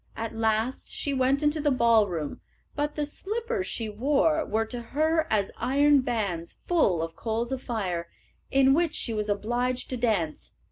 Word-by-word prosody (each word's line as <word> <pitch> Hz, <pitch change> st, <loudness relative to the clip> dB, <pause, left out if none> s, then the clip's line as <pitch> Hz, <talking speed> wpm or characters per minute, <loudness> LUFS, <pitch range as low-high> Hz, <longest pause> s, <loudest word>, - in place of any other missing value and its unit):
At 225 Hz, 0 st, -4 dB
last 225 Hz, +2 st, 0 dB
she 285 Hz, -, -2 dB
went 270 Hz, +2 st, +2 dB
into 295 Hz, +1 st, +2 dB
the 295 Hz, -, +2 dB
ballroom, 220 Hz, -, +2 dB, 0.3 s
but 295 Hz, 0 st, -1 dB
the 300 Hz, -, -1 dB
slippers 430 Hz, +6 st, -3 dB
she 225 Hz, -, -3 dB
wore 285 Hz, +8 st, +2 dB
were 225 Hz, -5 st, 0 dB
to 240 Hz, +2 st, -5 dB
her 310 Hz, +6 st, +1 dB
as 205 Hz, -3 st, +1 dB
iron 285 Hz, +1 st, +4 dB
bands 200 Hz, -9 st, -2 dB
full 195 Hz, -, +3 dB
of 165 Hz, 0 st, -6 dB
coals 230 Hz, +2 st, -2 dB
of 265 Hz, -1 st, -2 dB
fire, 185 Hz, -9 st, -3 dB, 0.4 s
in 270 Hz, 0 st, +5 dB
which 330 Hz, +1 st, +1 dB
she 230 Hz, -, -1 dB
was 210 Hz, -1 st, -2 dB
obliged 240 Hz, +6 st, -1 dB
to 255 Hz, -, -2 dB
dance. 210 Hz, -10 st, -1 dB
245 Hz, 170 wpm, -27 LUFS, 215-290 Hz, 0.4 s, in